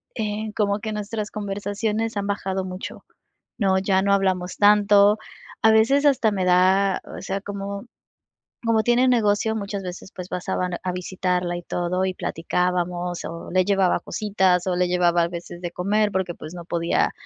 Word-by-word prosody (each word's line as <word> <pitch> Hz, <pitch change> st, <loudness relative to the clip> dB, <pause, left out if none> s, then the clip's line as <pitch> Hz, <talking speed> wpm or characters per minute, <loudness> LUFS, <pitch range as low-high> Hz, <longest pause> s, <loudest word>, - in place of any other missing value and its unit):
eh, 215 Hz, -1 st, -3 dB
como 205 Hz, -1 st, +1 dB
que 220 Hz, +1 st, -4 dB
nuestras 210 Hz, 0 st, -4 dB
conversaciones 210 Hz, +2 st, -2 dB
han 200 Hz, -, -2 dB
bajado 190 Hz, -2 st, -2 dB
mucho. 185 Hz, +1 st, -7 dB, 0.6 s
No, 190 Hz, -2 st, +3 dB
ya 190 Hz, 0 st, +2 dB
no 200 Hz, 0 st, +2 dB
hablamos 185 Hz, -2 st, 0 dB
tanto. 205 Hz, 0 st, +5 dB, 0.4 s
A 220 Hz, -, +6 dB
veces 230 Hz, +7 st, +4 dB
hasta 245 Hz, -6 st, +4 dB
me 190 Hz, -2 st, -1 dB
da 185 Hz, +2 st, +3 dB
o -, -, -8 dB
sea, 195 Hz, +1 st, -3 dB
como 200 Hz, +1 st, -5 dB, 0.8 s
como 225 Hz, -1 st, +3 dB
tiene 240 Hz, +3 st, +3 dB
negocio, 220 Hz, -2 st, +2 dB
muchas 200 Hz, -2 st, -4 dB
veces, 185 Hz, +1 st, -8 dB
pues, 180 Hz, 0 st, -7 dB
pasaban 180 Hz, 0 st, -2 dB
a 185 Hz, -, -1 dB
visitarla 180 Hz, -1 st, -2 dB
y 175 Hz, -, -8 dB
todo 180 Hz, +2 st, -1 dB
y 190 Hz, -, -1 dB
platicábamos, 180 Hz, 0 st, -2 dB
o 165 Hz, +1 st, -7 dB
le 185 Hz, 0 st, +3 dB
llevaba 195 Hz, -3 st, +2 dB
cositas, 190 Hz, -4 st, +1 dB
o 180 Hz, -, +1 dB
le 180 Hz, 0 st, +2 dB
llevaba 175 Hz, -1 st, +3 dB
a -, -, +1 dB
veces 175 Hz, 0 st, -8 dB
de 175 Hz, -1 st, -4 dB
comer 205 Hz, +4 st, +1 dB
porque, 185 Hz, -2 st, -2 dB
pues, 155 Hz, -, -9 dB
no 175 Hz, -1 st, -7 dB
podía 170 Hz, -1 st, +1 dB
195 Hz, 170 wpm, -23 LUFS, 180-210 Hz, 0.8 s, A